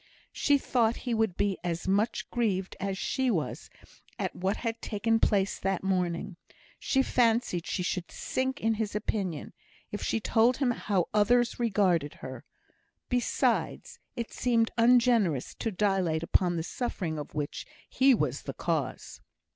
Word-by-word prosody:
She 285 Hz, -1 st, +3 dB
thought 240 Hz, -4 st, +1 dB
he 245 Hz, -, 0 dB
would 220 Hz, -5 st, 0 dB
be 200 Hz, -2 st, 0 dB
as 170 Hz, 0 st, -3 dB
much 205 Hz, +4 st, +1 dB
grieved 195 Hz, -6 st, -1 dB
as 195 Hz, 0 st, -2 dB
she 260 Hz, +5 st, 0 dB
was 170 Hz, -10 st, -2 dB, 0.5 s
at -, -, -3 dB
what 190 Hz, +3 st, -1 dB
had 230 Hz, -1 st, -3 dB
taken 225 Hz, +1 st, 0 dB
place 195 Hz, -3 st, +1 dB
that 195 Hz, -1 st, -1 dB
morning; 180 Hz, -1 st, -1 dB, 0.4 s
she 270 Hz, -1 st, +2 dB
fancied 230 Hz, -9 st, +1 dB
she 180 Hz, -, -1 dB
should 175 Hz, -1 st, -2 dB
sink 260 Hz, +1 st, -2 dB
in 225 Hz, +1 st, +1 dB
his 215 Hz, -2 st, -3 dB
opinion 195 Hz, -7 st, -2 dB, 0.4 s
if 205 Hz, -, -4 dB
she 225 Hz, -, 0 dB
told 230 Hz, +3 st, +3 dB
him 265 Hz, -3 st, +2 dB
how 195 Hz, -6 st, 0 dB
others 240 Hz, +4 st, +3 dB
regarded 190 Hz, -10 st, +1 dB
her; -, -, -8 dB, 0.7 s
besides, 245 Hz, -1 st, 0 dB, 0.2 s
it 235 Hz, -1 st, -5 dB
seemed 230 Hz, -2 st, +1 dB
ungenerous 230 Hz, -, +3 dB
to 225 Hz, -, -3 dB
dilate 185 Hz, -5 st, +1 dB
upon 175 Hz, +1 st, +2 dB
the 165 Hz, -, -2 dB
suffering 175 Hz, -7 st, -3 dB
of 145 Hz, -, -8 dB
which 145 Hz, -1 st, -4 dB, 0.2 s
he 265 Hz, 0 st, +4 dB
was -, -, -1 dB
the -, -, -6 dB
cause. -, -, -3 dB
210 Hz, 150 wpm, -29 LUFS, 185-235 Hz, 0.7 s, he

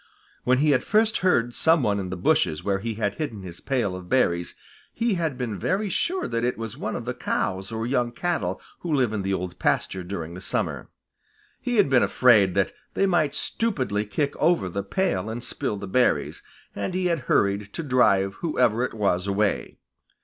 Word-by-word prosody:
When 130 Hz, +1 st, +4 dB
he 150 Hz, +2 st, +3 dB
had 135 Hz, -, +2 dB
first 220 Hz, +1 st, +3 dB
heard 120 Hz, -10 st, +2 dB
some 160 Hz, 0 st, +3 dB
one 100 Hz, -3 st, +1 dB
in 95 Hz, -2 st, -4 dB
the 95 Hz, -, -4 dB
bushes 75 Hz, -3 st, +1 dB
where 100 Hz, -1 st, 0 dB
he 115 Hz, +2 st, -4 dB
had 105 Hz, -2 st, -1 dB
hidden 115 Hz, -11 st, -4 dB
his 85 Hz, -2 st, -9 dB
pail 120 Hz, -9 st, -1 dB
of 90 Hz, -1 st, -9 dB
berries, 85 Hz, -10 st, +1 dB, 0.4 s
he 230 Hz, -1 st, 0 dB
had 160 Hz, -7 st, -1 dB
been 115 Hz, -6 st, -3 dB
very 195 Hz, -, 0 dB
sure 365 Hz, -, 0 dB
that 115 Hz, 0 st, -2 dB
it 125 Hz, +1 st, 0 dB
was 115 Hz, -2 st, -5 dB
one -, -, -4 dB
of -, -, -5 dB
the -, -, -2 dB
cows 95 Hz, +3 st, -2 dB
or 115 Hz, 0 st, -3 dB
young 120 Hz, -1 st, 0 dB
cattle 120 Hz, -, -2 dB, 0.2 s
who 170 Hz, -, -4 dB
live 130 Hz, -7 st, +2 dB
in 105 Hz, -, -1 dB
the 95 Hz, 0 st, 0 dB
Old 90 Hz, -1 st, -5 dB
Pasture 95 Hz, -1 st, 0 dB
during 85 Hz, -3 st, -5 dB
the 90 Hz, -, -8 dB
summer. -, -, -3 dB, 0.7 s
He 245 Hz, -1 st, -1 dB
had 205 Hz, -6 st, +5 dB
been 130 Hz, -2 st, +4 dB
afraid 110 Hz, -8 st, +4 dB
that 100 Hz, -1 st, +2 dB, 0.2 s
they 195 Hz, -, +3 dB
might 155 Hz, -6 st, +2 dB
stupidly 130 Hz, -, 0 dB
kick 140 Hz, +8 st, -1 dB
over 170 Hz, -, +2 dB
the 100 Hz, +3 st, -3 dB
pail 100 Hz, -, -1 dB
and 115 Hz, +2 st, -5 dB
spill 105 Hz, -, -3 dB
the 100 Hz, -, -6 dB
berries, 125 Hz, +6 st, +1 dB, 0.3 s
and 185 Hz, -, -3 dB
he 185 Hz, 0 st, 0 dB
had 170 Hz, -2 st, +1 dB
hurried 100 Hz, 0 st, +2 dB
to 165 Hz, -, -4 dB
drive 110 Hz, -8 st, +3 dB
whoever 125 Hz, -8 st, +2 dB
it 125 Hz, -, -3 dB
was 100 Hz, -3 st, 0 dB
away. 100 Hz, +1 st, 0 dB
115 Hz, 200 wpm, -25 LUFS, 100-150 Hz, 0.7 s, had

